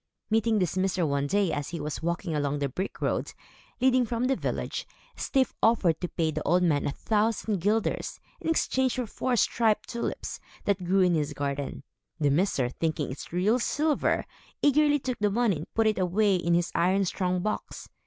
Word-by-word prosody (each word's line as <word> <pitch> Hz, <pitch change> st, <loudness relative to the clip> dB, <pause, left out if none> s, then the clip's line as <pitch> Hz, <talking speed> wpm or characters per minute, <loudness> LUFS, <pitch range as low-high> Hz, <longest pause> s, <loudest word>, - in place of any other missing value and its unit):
Meeting 225 Hz, 0 st, +3 dB
this 180 Hz, -3 st, 0 dB
miser 185 Hz, -2 st, +1 dB
one 140 Hz, -1 st, 0 dB
day, 195 Hz, 0 st, +2 dB
as 145 Hz, -1 st, -3 dB
he 170 Hz, -, -5 dB
was 150 Hz, 0 st, -4 dB
walking 170 Hz, +1 st, -2 dB
along 145 Hz, -1 st, 0 dB
the 140 Hz, -1 st, 0 dB
brick 185 Hz, +9 st, -5 dB
road, -, -, -1 dB, 0.5 s
leading 255 Hz, 0 st, +4 dB
from 235 Hz, +1 st, -2 dB
the 265 Hz, +1 st, +2 dB
village, -, -, -3 dB, 0.3 s
Styf 265 Hz, -3 st, 0 dB
offered 190 Hz, -8 st, +3 dB
to 180 Hz, -, -1 dB
pay 165 Hz, -2 st, -1 dB
the -, -, -3 dB
old 180 Hz, +3 st, +2 dB
man 150 Hz, -5 st, +2 dB
a -, -, 0 dB
thousand 215 Hz, +2 st, 0 dB
guilders, 210 Hz, +5 st, 0 dB, 0.2 s
in -, -, -3 dB
exchange 265 Hz, -5 st, +1 dB
for 250 Hz, -2 st, -1 dB
four 245 Hz, +3 st, -1 dB
striped 220 Hz, -2 st, +2 dB
tulips, 235 Hz, -, -4 dB, 0.3 s
that 200 Hz, -2 st, +1 dB
grew 190 Hz, +2 st, +3 dB
in 180 Hz, -1 st, +4 dB
his 150 Hz, -2 st, 0 dB
garden. 140 Hz, -1 st, -3 dB, 0.4 s
The 145 Hz, -2 st, +2 dB
miser, 145 Hz, -6 st, +1 dB
thinking 155 Hz, 0 st, -2 dB
it 130 Hz, -, -8 dB
real 200 Hz, +8 st, +2 dB
silver, 300 Hz, +4 st, +1 dB, 0.4 s
eagerly 295 Hz, +1 st, +4 dB
took 255 Hz, -3 st, -4 dB
the 210 Hz, 0 st, +2 dB
money 215 Hz, -3 st, +1 dB
and 155 Hz, -, -9 dB
put 225 Hz, -, +3 dB
it 215 Hz, -2 st, +2 dB
away 195 Hz, +2 st, +2 dB
in 170 Hz, -1 st, +1 dB
his 175 Hz, 0 st, 0 dB
iron 190 Hz, +3 st, +2 dB
strong 180 Hz, 0 st, -1 dB
box. 215 Hz, -, -4 dB
190 Hz, 190 wpm, -27 LUFS, 160-225 Hz, 0.5 s, leading